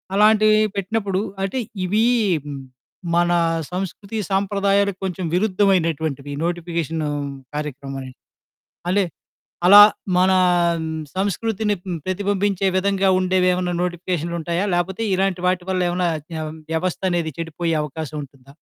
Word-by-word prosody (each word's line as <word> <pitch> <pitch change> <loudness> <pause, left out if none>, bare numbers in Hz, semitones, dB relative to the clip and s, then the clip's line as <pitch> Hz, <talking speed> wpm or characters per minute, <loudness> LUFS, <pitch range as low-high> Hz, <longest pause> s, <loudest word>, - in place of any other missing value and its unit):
అలాంటివి 215 +1 +5 0.2
పెట్టినప్పుడు 200 -1 -1 0.2
అంటే 195 +7 -2 0.3
ఇవి 210 +5 +2 1.1
మన 175 0 +3 0.4
సంస్కృతి 195 +3 -5
సాంప్రదాయాలకు 200 0 +1
కొంచెం 185 -1 -3
విరుద్ధమైనటువంటివి 165 -8 +1
నోటిఫికేషను 165 -3 -2 0.5
కార్యక్రమనేది. 135 -3 -6 0.7
అంటే 200 +1 +3 0.6
అలా 205 +2 +10 0.4
మనా 185 +1 +4 0.8
సంస్కృతిని 205 +2 0
హ్మ్, 175 -3 -4
ప్రతిబింబించే 200 0 0
విధంగా 195 0 +1
ఉండేవి 185 0 +2
ఏమన్నా 180 -1 -1
నోటిఫికేషన్లుంటాయా? 170 0 -2
లేపోతే 190 +5 -1
ఇలాంటి 190 -1 0
వాటి 180 -1 0
వల్ల 185 -1 +1
ఏమన్నా 180 0 0 0.2
వ్య 160 -1 -4 0.3
వ్యవస్థ 180 +2 -1
అనేది 165 -3 -1
చెడిపోయే 165 0 -2
అవకాశం 150 +1 -6
ఉంటుందా? 135 0 -19
185 Hz, 105 wpm, -21 LUFS, 165-200 Hz, 1.1 s, అలా